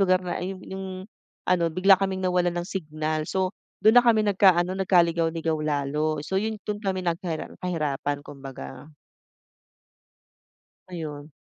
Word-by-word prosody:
lugar 185 -1 +3
na 175 -1 -3
ayung, 185 +1 -5
yung 190 -1 -6 0.4
ano, 170 -2 +2
bigla 185 +3 +4
kaming 190 -1 -1
nawalan 180 -1 +1
ng 175 - -1
signal. 155 -4 -3
So 190 0 0 0.3
dun 220 +3 +7
na 245 - +5
kami 220 -2 +5
nagka-ano 190 -2 +3
nagka-ligaw-ligaw 165 -3 +2
lalo. 150 +1 -1
So 190 - 0
yun 220 +1 -2
dun 210 -1 -3
kami 190 -2 -2
nagharar 170 -1 -2
na 180 - -4
hirapan, 145 -3 -2
kumbaga. 135 +1 -10 1.9
Ayun. 155 -4 -7
175 Hz, 135 wpm, -26 LUFS, 155-190 Hz, 1.9 s, dun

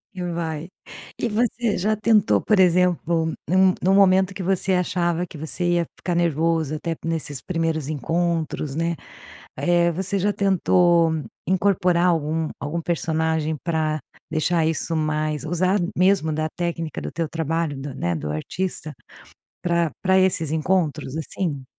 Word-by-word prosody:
E 185 - -5
vai. 165 -1 -3 0.5
E - - 0
você 230 0 0
já 215 +4 +1
tentou, 215 0 +3
por 215 -3 +2
exemplo, 170 -2 +2
num 185 +1 +4
num 190 +2 +3
momento 190 -1 +5
que 190 - -5
você 190 +1 +1
achava 175 -1 0
que 165 - -11
você 160 +4 -4
ia 170 -1 +1
ficar 180 - -2
nervoso 165 -2 +1
até 165 +1 -3
nesses 155 -5 -3
primeiros 165 -4 -1
encontros, 160 -1 -1
né. 165 +1 0 0.6
Eh, 175 -1 +3
você 190 +3 -2
já 205 +2 +1
tentou 175 -3 +3 0.4
incorporar 180 -2 +2
algum 160 -1 0
algum 160 +4 -3
personagem 160 -1 0
pra 155 -2 0 0.3
deixar 160 +1 +1
isso 160 +1 -1
mais 155 -1 -1
usar 185 +4 +1 0.2
mesmo 185 -3 +3
da 155 +1 -1
técnica 170 -2 -3
do - - -5
teu 165 -2 -3
trabalho 165 -2 -2
do, 135 -1 -6
né, 85 -6 -1
do 75 -1 -4
artista 155 - -4 0.7
pra 170 -2 +1
pra 190 0 +4
esses 175 -5 +2
encontros 160 -4 0
assim? 155 -3 -3
170 Hz, 145 wpm, -23 LUFS, 155-185 Hz, 0.7 s, momento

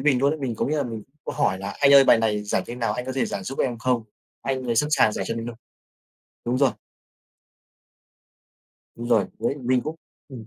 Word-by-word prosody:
mình 140 -4 +3
luôn 140 - +4
ấy, 155 - -4
mình 130 -5 -2
có - - -1
nghĩa 155 +2 0
là 145 - +1
mình 115 -4 -5 0.2
cũng - - -4
hỏi 95 - +1
là 100 +1 -5
"Anh 140 -1 +6
ơi 140 -1 +9
bài 115 - +6
này 105 -2 0
giải 105 - 0
thế 120 - -6
nào? 120 -2 -1
Anh 125 +1 -4
có 130 - -3
thể 135 - 0
giải 100 - -4
giúp 135 - -6
em 120 -3 0
không?" 125 0 +1 0.4
Anh 130 -1 -2
ấy 115 -1 0
sẵn 150 +5 +2
sàng 130 -7 +4
giải 95 - -3
cho 115 - -2
mình 115 0 -4
luôn. 120 -1 -6 0.9
Đúng 125 +2 +1
rồi. 135 -2 +4 2.2
Đúng 120 +1 -6
rồi, 110 -6 +3
với - - 0
mình 125 -1 +1
cũng 155 +1 -5 0.3
ừm. 120 -5 -9
125 Hz, 235 wpm, -24 LUFS, 115-135 Hz, 2.2 s, ơi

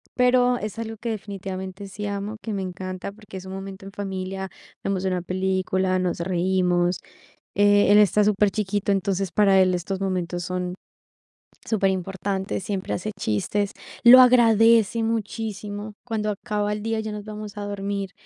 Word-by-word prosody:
pero, 250 0 +4
es 215 0 -5
algo 225 -1 -4
que, 235 +2 -4
definitivamente, 195 -2 -6
sí 205 +2 -6
amo, 200 +1 -4
que 220 - -3
me 195 - -2
encanta, 185 +1 -5
porque 205 -2 -11
es 185 - -9
un 190 - -7
momento 195 0 -8
en - - -9
familia, 190 -1 -4 0.3
vemos 195 -1 -1
una 185 -1 0
película, 185 0 0
nos 180 -2 -1
reímos, 180 0 +1 0.6
eh, 205 0 +5
él, 205 - +7
está 210 0 +4
superchiquito, 205 0 +1
entonces 195 -1 0
para 195 -1 +4
él 185 -1 +3
estos 185 +2 -3
momentos 180 -2 -2
son 180 0 -3 0.9
superimportantes. 195 -1 -1
Siempre 190 -1 -3
hace 195 +4 -3
chistes, 195 - -1 0.3
lo 250 +2 +10
agradece 230 -2 +5
muchísimo 215 -2 -3
cuando 220 -3 -2
acaba 210 +1 -2
el 210 0 -5
día 225 0 -1
y - - -3
ya 215 - -4
nos 210 -1 -7
vamos 210 -1 -8
a 205 - -4
dormir. 200 -1 -3
200 Hz, 160 wpm, -24 LUFS, 190-210 Hz, 0.9 s, lo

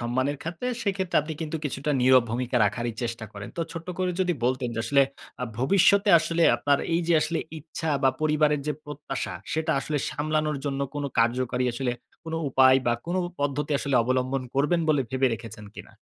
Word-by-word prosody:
সম্মানের 130 +4 -1
খাতে, 170 +9 -5 0.2
সেক্ষেত্রে 190 -3 -1
আপনি 160 +2 -5
কিন্তু 160 0 -3
কিছুটা 145 +1 -2
নীরব 130 0 +6
ভূমিকা 125 +1 -1
রাখারই 120 +3 -1
চেষ্টা 115 -1 -3
করেন। 100 -1 -8
তো - - -2
ছোট্ট 165 0 -7
করে 185 -1 +1
যদি 180 -1 +2
বলতেন 130 0 0
যে 115 - -1
আসলে 140 -1 +4 0.4
আ - - +1
ভবিষ্যতে 195 - +4
আসলে 170 +1 0
আপনার 145 -1 +2 0.2
এই 170 - +2
যে 170 - +4
আসলে 165 +2 -1 0.2
ইচ্ছা 160 +1 -4
বা 135 - +5
পরিবারের 150 -1 +2
যে 150 - +1
প্রত্যাশা। 150 0 -5 0.2
সেটা 160 0 0
আসলে 150 0 -2
সামলানোর 155 0 -1
জন্য 140 -1 -2
কোনো 145 -1 -2
কার্যকরী 125 +2 +1
আসলে 125 0 -1 0.3
কোনো 160 0 -3
উপায় 130 0 +6
বা 120 - +4
কোনো 180 +2 -1 0.2
পদ্ধতি 145 +1 -1
আসলে 140 -1 -2
অবলম্বন 130 +2 0
করবেন 150 +5 +2
বলে 145 -3 +3
ভেবে 130 0 +2
রেখেছেন 110 -1 -10
কিনা? - - -10
145 Hz, 185 wpm, -26 LUFS, 130-160 Hz, 0.4 s, নীরব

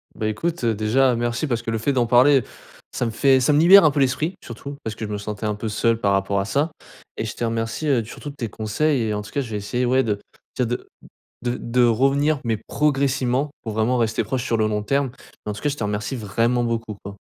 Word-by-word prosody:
Bah, 110 - -2
écoute, 155 +8 -2
heu, 115 -1 +2
déjà 120 +5 +2
merci 120 +4 -1
parce 120 -5 -1
que - - -3
le 115 - -1
fait 125 +6 0
d'en 125 -3 +2
parler, 130 +3 +5 0.5
ça - - -1
me 115 - -1
fait 130 +4 +4
ça 130 - +3
me 145 - +4
libère 180 +4 +8
un 155 - +6
peu 145 - -1
l'esprit, 140 +7 +1
surtout. 140 +5 -8
Parce 110 - -4
que - - -5
je - - -8
me 105 - -2
sentais 105 +1 -5
un 105 - 0
peu 105 +2 -4
seul 115 +2 +1
par 100 -2 +2
rapport 95 0 +1
à - - -1
ça 140 +9 0 0.5
et - - -2
je 110 - -5
te - - -3
remercie, 115 +5 -2
heu, 125 -5 +2
surtout 135 +6 -8
de - - -12
tes 115 -5 -3
conseils 120 +7 0
et 110 -1 -1
en 105 - -3
tout 105 - -11
cas, 145 - -1
je 120 - -8
vais 105 - -3
essayer, 120 +5 -2
ouais, 130 +2 +3
de 105 -4 -1 0.4
je 130 - +1
veux - - +1
dire 120 +2 -1
de - - -21 0.5
de 120 0 -1
de 120 +1 +1
revenir, 135 +5 +2
mais 115 -2 0
progressivement 135 -2 +1
pour 110 - -5
vraiment 115 +3 +1
rester 115 -2 0
proche 130 -3 -2
sur 115 - 0
le 110 -1 +2
long 105 -1 -1
terme. 140 +4 0 0.4
En-tout-cas, 105 +6 -2
je 145 - -2
te 115 - -3
remercie 105 +5 -2
vraiment 115 +3 0
beaucoup, 115 -2 -3
quoi. 100 0 -8
120 Hz, 260 wpm, -22 LUFS, 110-135 Hz, 0.5 s, libère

